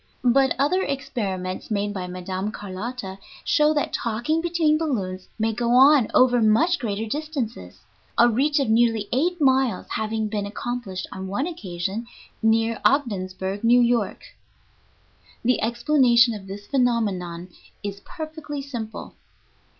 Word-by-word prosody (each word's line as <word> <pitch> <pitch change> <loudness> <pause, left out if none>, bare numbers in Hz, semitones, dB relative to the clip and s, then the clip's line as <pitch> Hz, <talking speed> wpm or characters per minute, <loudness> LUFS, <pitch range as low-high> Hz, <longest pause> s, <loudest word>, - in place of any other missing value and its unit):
But 265 +2 +4
other 300 +7 +2
experiments 200 - -3
made 205 -1 -1
by 185 -2 -4
Mme. 185 +2 -4
Carlotta 205 0 -6 0.3
show 300 0 +4
that 295 - -1
talking 240 +8 -1
between 335 -3 +2
balloons 190 - -3
may 225 0 0
go 240 +1 +1
on 270 -2 +7
over 245 -1 +5
much 265 +12 +3
greater 220 -3 -2
distances, 280 -2 -5 0.4
a 240 - +7
reach 280 +6 +2
of 275 - +1
nearly 225 -2 +2
eight 345 +8 +1
miles 265 -4 +2
having 220 0 -1
been 205 -1 -3
accomplished 210 -3 -4
on 190 0 -6
one 205 +9 -1
occasion 200 - -4 0.3
near 225 0 +2
Ogdensburg, 195 -7 0
New 240 +2 +5
York. 235 -4 +1 1.2
The 250 +1 +2
explanation 240 0 +4
of 200 -3 -8
this 200 +1 -8
phenomenon 205 -9 -1 0.3
is 200 -1 -5
perfectly 310 +2 -7
simple. 235 -6 -7
230 Hz, 130 wpm, -24 LUFS, 205-270 Hz, 1.2 s, on